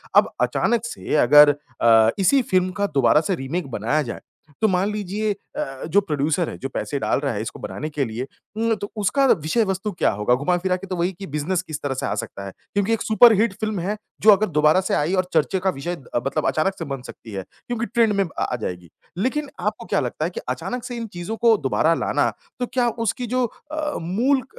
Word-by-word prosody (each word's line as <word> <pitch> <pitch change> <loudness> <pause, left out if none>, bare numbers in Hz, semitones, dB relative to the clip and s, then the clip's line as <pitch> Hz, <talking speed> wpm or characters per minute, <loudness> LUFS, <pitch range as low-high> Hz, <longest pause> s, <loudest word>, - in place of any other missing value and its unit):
अब - - +5
अचानक 235 -1 +1
से 235 - -3
अगर 145 +1 +8 0.3
अ, 115 -1 +6
इसी 265 +8 +4
फ़िल्म 185 -4 +1
का 200 - +3
दोबारा 135 +3 +5
से 190 +1 -1
रीमेक 140 +3 -3
बनाया 120 +9 0
जाए, 120 -4 -5 0.4
तो 220 - +5
मान 190 +1 +1
अ, - - -2
लीजिए 210 +1 -2 0.5
जो 200 +5 +4
प्रोड्यूसर 155 -1 0
है, - - -7
जो 135 - -5
पैसे 140 - -3
डाल - - +1
रहा 140 -4 -1
है 105 - -3
इसको 110 - -6
बनाने 155 - -5
के 145 -3 -1
लिए 115 +4 -5 0.3
उम, 225 0 +2
तो 205 -1 -7
उसका 215 +7 +2
विषय 180 - +2
वस्तु 195 +2 -2
क्या 175 - +1
होगा? 105 +4 +1
घुमा-फिरा 180 +6 0
के 195 +1 -10
तो 185 - -3
वही 175 +2 0
कि 195 - -6
बिज़नेस 155 +5 -1
किस 155 -5 -7
तरह 140 -2 -1
से - - -3
आ - - -1
सकता 110 -4 -6
है? 95 - -6 0.2
क्योंकि 200 +3 +1
एक 225 - -1
सुपरहिट 220 -1 +5
फ़िल्म 215 -3 -2
है, 200 +5 -2 0.2
जो 215 - +8
अगर 205 +2 +4
दोबारा 150 +4 +4
से 190 - -2
आई 155 +6 0
और 185 -1 +1
चर्चे 165 +4 +2
का 190 - +1
विषय 175 +2 -3 0.2
अ, - - +4
मतलब 155 +2 -1
अचानक 190 +5 +1
से 165 - -3
बन 135 -2 -5
सकती 110 - -11
है 95 -1 -4 0.2
क्योंकि 235 -1 -2
ट्रेंड 230 -3 +2
में 195 0 +2
अ, 170 - -9
आ 125 - -1
जाएगी। 90 -3 -5 0.3
लेकिन 270 +7 -1
आपको - - -2
क्या - - +1
लगता - - -2
है - - -1
कि 475 - -5
अचानक 250 -1 -3
से 245 - -5
इन 230 -1 -4
चीज़ों 175 +6 -4
को 230 -2 +5
दोबारा 155 +3 +2
लाना, - - +1 0.3
तो 245 - 0
क्या 245 -2 +2 0.2
उसकी 245 +2 -1
जो 250 +1 +1 0.3
अ, 310 -1 -2
मूल 245 +11 +1
अ, - - -15
185 Hz, 230 wpm, -22 LUFS, 145-215 Hz, 0.5 s, अगर